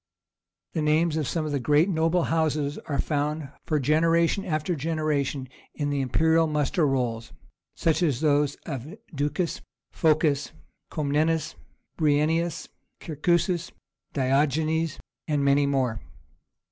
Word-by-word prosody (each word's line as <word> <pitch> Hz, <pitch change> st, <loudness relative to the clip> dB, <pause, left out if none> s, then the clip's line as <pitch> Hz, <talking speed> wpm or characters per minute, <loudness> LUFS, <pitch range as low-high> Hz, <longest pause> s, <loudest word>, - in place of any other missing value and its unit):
The 160 Hz, -, -1 dB
names 155 Hz, +1 st, +2 dB
of 155 Hz, -4 st, -1 dB
some 160 Hz, -2 st, -1 dB
of 155 Hz, -, -3 dB
the 140 Hz, -, 0 dB
great 150 Hz, +6 st, +3 dB
noble 165 Hz, -1 st, +1 dB
houses 155 Hz, -3 st, 0 dB
are 140 Hz, -, -1 dB
found 150 Hz, -1 st, -1 dB, 0.2 s
for 155 Hz, -2 st, +1 dB
generation 165 Hz, +6 st, +2 dB
after 155 Hz, +1 st, -1 dB
generation 150 Hz, -3 st, -1 dB, 0.3 s
in 145 Hz, -1 st, -2 dB
the 140 Hz, -1 st, 0 dB
imperial 160 Hz, +5 st, +3 dB
muster 150 Hz, +2 st, +1 dB
rolls, 120 Hz, -4 st, -1 dB, 0.4 s
such 165 Hz, +1 st, +1 dB
as 150 Hz, -8 st, +1 dB
those 145 Hz, -2 st, +2 dB
of 145 Hz, -, -6 dB, 0.2 s
Ducas, 150 Hz, +4 st, -2 dB, 0.3 s
Phocas, 155 Hz, -3 st, +1 dB, 0.4 s
Comnenus, 155 Hz, +1 st, 0 dB, 0.4 s
Bryennius, 160 Hz, +2 st, +1 dB, 0.3 s
Kerkuas, 170 Hz, +3 st, 0 dB, 0.4 s
Diogenes, 150 Hz, +4 st, +1 dB, 0.3 s
and 145 Hz, -2 st, +1 dB
many 140 Hz, +1 st, +4 dB
more. 130 Hz, -6 st, 0 dB
150 Hz, 120 wpm, -26 LUFS, 140-160 Hz, 0.4 s, many